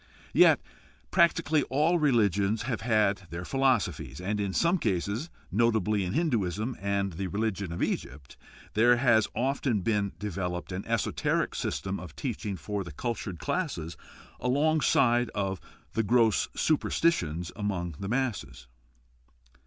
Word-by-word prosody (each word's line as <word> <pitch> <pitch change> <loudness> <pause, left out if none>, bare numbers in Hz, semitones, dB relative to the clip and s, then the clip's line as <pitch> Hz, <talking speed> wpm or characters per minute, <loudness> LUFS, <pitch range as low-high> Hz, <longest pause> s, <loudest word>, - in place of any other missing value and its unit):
Yet - - +6 0.5
practically 165 -3 +3
all 155 +6 +2
religions 110 - +2
have 120 -2 -3
had 105 -3 +2
their 90 +1 -6
philosophies, 135 -7 0
and 100 +3 -2
in 100 -2 -1
some 170 - +2
cases, 105 - -1 0.2
notably 110 -1 +2
in 90 +1 -3
Hinduism 115 - 0
and 100 -1 -1
the 95 +3 -3
religion 100 -2 -2
of 85 - -2
Egypt, 65 +1 -4 0.4
there 120 +3 +5
has 120 -4 +4
often 130 -4 0
been 100 -1 0
developed 90 -3 -4
an 95 +2 -4
esoteric - - 0
system 95 0 -3
of 85 -5 -10
teaching 110 -6 -4
for 105 0 -3
the 85 - -9
cultured 105 - -4
classes 115 - -3 0.4
along 150 +5 +2
side 120 -3 +3
of 95 -2 -2 0.5
gross 115 -2 +3
superstitions 90 - +1
among 95 -5 -2
the 100 - -4
masses. 120 - -2
105 Hz, 130 wpm, -28 LUFS, 95-125 Hz, 0.5 s, Yet